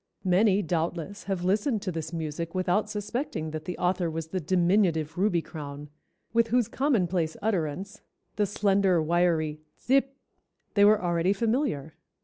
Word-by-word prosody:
Many 195 +2 +3
doubtless, 170 +3 -3
have 190 -3 -2
listened 205 +4 +1
to 185 - -2
this 160 -2 -5
music 165 +1 -4
without 185 +3 +1
suspecting 215 - -3
that 155 0 -6
the 180 - -4
author 180 -1 0
was 160 0 -5
the 185 - -2
diminutive 175 -2 +2
Ruby 180 -3 +1
crown, 145 -2 -8 0.4
with 230 0 +3
whose 240 -1 +2
commonplace 185 - 0
utterance, 195 0 -2 0.3
the 205 -1 +1
slender, 195 -3 +2
wiry 160 -2 +1 0.2
'tsip,' 270 +1 +1 0.6
they 200 - +4
were 210 0 +6
already 175 +2 +2
familiar. 205 - -1
185 Hz, 140 wpm, -27 LUFS, 165-210 Hz, 0.6 s, were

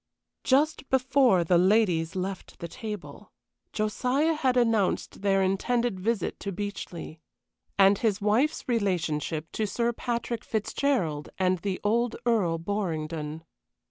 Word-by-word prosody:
Just 280 +1 +2
before 255 -7 +4
the 170 +1 +3
ladies 185 -4 +2
left 190 0 -5
the 170 - -6
table, 210 -1 -8 0.4
Josiah 250 +9 +1
had 260 -5 +1
announced 225 -7 +1
their 195 -1 +3
intended 225 +3 0
visit 220 +2 -1
to 200 - -4
Beechleigh, 190 -4 -6 0.6
and 195 0 +5
his 215 -3 +1
wife's 220 +9 +1
relationship 170 -8 -1
to 215 - -1
Sir 235 +4 0
Patrick 235 -1 -3
Fitzgerald 210 - -1
and 185 -1 +1
the 190 +1 -3
old 235 +3 +1
Earl 200 -9 +2
Borringdon. 160 -4 -3
205 Hz, 120 wpm, -27 LUFS, 180-235 Hz, 0.6 s, and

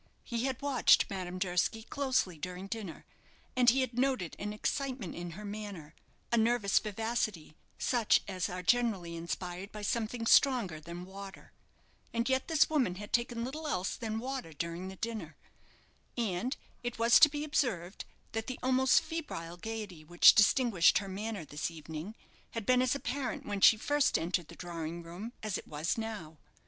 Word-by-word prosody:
He 235 0 -2
had 265 -2 -2
watched 275 -7 +4
Madame 185 -2 -4
Durski 185 +4 0
closely 260 -9 0
during 180 +3 -5
dinner, 200 -4 -6 0.5
and 250 -1 +6
he 265 +3 +3
had 245 -1 -2
noted 255 -10 0
an 205 +1 -3
excitement 250 -1 -2
in 175 0 -6
her 210 - -7
manner, 200 -7 -7 0.4
a 235 - +3
nervous 225 -3 +3
vivacity, 215 -6 -2 0.2
such 235 -4 +3
as 185 -2 -2
are 180 0 -5
generally 210 -6 +1
inspired 175 +3 -5
by 210 -1 -7
something 230 +1 -1
stronger 230 - +4
than 170 +3 -8
water. 195 +1 -10 0.6
And 235 +1 +1
yet 265 0 +1
this 320 -3 +4
woman 265 - +1
had 205 +2 -9
taken 235 -1 0
little 305 +5 -5
else 185 -6 -1
than 220 -2 -3
water 255 -8 -4
during 170 +4 -4
the 190 - -7
dinner. 205 -8 -5 0.8
And 230 +2 -1 0.2
it 240 -1 -4
was 230 +1 +6
to 300 - +9
be 295 0 -4
observed 225 - -1 0.3
that 225 0 -3
the 255 - -4
almost 260 0 +4
febrile 175 - -5
gaiety 210 -5 -6
which 175 +3 +7
distinguished 215 -4 +5
her 200 - -2
manner 205 -2 -4
this 150 +2 -3
evening 160 +5 -7 0.4
had 225 -3 -3
been 250 +2 +4
as 255 +1 +2
apparent 275 -1 -3
when 205 -1 -3
she 220 - +8
first 290 +5 +2
entered 170 0 -1
the - - -12
drawing 170 -1 -5
room 185 +8 -8
as 215 -3 -1
it - - -13
was 155 - -1
now. 210 - -6
210 Hz, 170 wpm, -32 LUFS, 175-245 Hz, 0.8 s, to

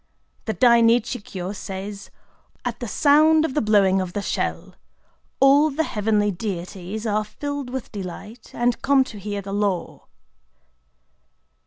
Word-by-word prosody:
The 220 - -1
Dai 235 -1 +5
Nichi 235 +2 +2
Kyō 190 -1 -6
says:—" 195 +1 -7 0.6
At 240 -1 -3
the 240 - -5
sound 310 +6 +4
of 270 - -3
the 300 - +1
blowing 195 -3 +3
of 180 -1 -5
the 205 - -3
shell, - - -3 0.7
all 280 +3 +5
the 305 +3 -1
heavenly 210 -4 0
deities 190 +2 -5
are 215 -1 +1
filled 285 +4 -5
with 260 -1 -6
delight, 205 +3 -8
and 240 0 0
come 270 -1 +4
to 215 -5 -10
hear 200 0 -4
the 195 0 -6
Law." 200 -3 -2
215 Hz, 145 wpm, -23 LUFS, 200-260 Hz, 0.7 s, Dai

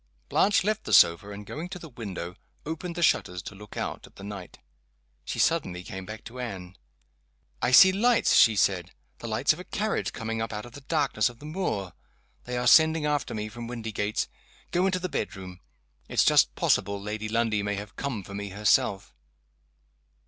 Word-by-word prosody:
Blanche 200 -1 +3
left 215 +2 -1
the - - -2
sofa, 85 +4 +6
and, 105 0 -8
going 160 - -6
to 180 - -6
the 170 - -10
window, 100 - -6 0.3
opened 165 +3 -5
the 175 - -1
shutters 90 - +2
to - - -8
look 105 +1 -12
out - - -4
at - - -22
the 100 - -12
night. 100 -3 -8 0.7
She - - -4
suddenly 90 0 +1
came 95 +1 -8
back 110 0 -8
to 120 +3 -10
Anne. 95 -7 -6 0.9
"I - - +2
see 190 +9 +9
lights," 230 +5 +3
she 110 -2 +6
said 95 -3 +1 0.3
"the - - -6
lights - - +2
of - - -11
a - - -6
carriage - - -2
coming 115 0 -4
up 115 - -3
out 105 0 -5
of 120 - -11
the 140 - -11
darkness 135 -7 +1
of 120 - -14
the 145 - -13
moor. 150 - -3 0.5
They 125 0 -3
are 125 - -1
sending 160 -1 +6
after 145 -5 -1
me, 105 0 -3
from 115 +2 -8
Windygates. 110 -3 -2 0.4
Go 180 +2 +2
into 185 -1 +1
t - - -15
he - - 0
bedroom. 95 - -5 0.5
It's - - +3
just - - +4
possible 100 0 +1
Lady 105 +2 -4
Lundie 115 -2 +1
may 100 0 -2
have 105 +1 -8
come 125 -8 -3
for 100 - -10
me 100 0 -5
herself." 100 -1 +1
110 Hz, 195 wpm, -27 LUFS, 100-150 Hz, 0.9 s, see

